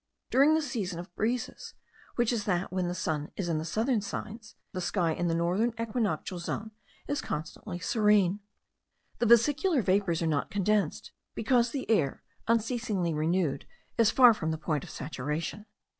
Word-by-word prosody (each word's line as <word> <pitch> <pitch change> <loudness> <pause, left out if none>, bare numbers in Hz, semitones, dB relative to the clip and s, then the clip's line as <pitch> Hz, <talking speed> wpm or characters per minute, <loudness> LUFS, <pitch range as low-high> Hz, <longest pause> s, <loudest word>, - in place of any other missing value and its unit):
During 285 +4 +5
this 315 -2 0
season 195 -7 -3
of 175 +1 -9
breezes, 245 +3 -2 0.4
which 240 0 +2
is 215 -3 -2
that 180 -2 -1
when 185 -1 0
the 175 - -2
sun 155 -4 -2
is 195 - -3
in 165 -2 0
the - - -3
southern 225 +6 +1
signs, 215 +2 -7 0.2
the 185 - -4
sky 175 -2 +1
in 175 +2 -1
the 165 - +1
northern 185 +8 +1
equinoctial 215 -6 -2
zone 220 +5 -4 0.4
is 290 -1 -1
constantly 170 +5 -5
serene. 205 -1 +3 0.8
The 240 - +2
vesicular 285 - +4
vapours 185 -4 +1
are - - +1
not 150 -3 0
condensed, 205 -4 0 0.2
because 235 +1 +2
the 270 +1 -4
air, 165 -12 +1 0.2
unceasingly 225 -6 0
renewed, 155 -2 0 0.3
is 225 -2 +6
far 245 -1 +7
from 160 -6 -3
the 160 - -1
point 155 -3 -2
of - - -10
saturation. 150 - -4
200 Hz, 165 wpm, -29 LUFS, 170-230 Hz, 0.8 s, far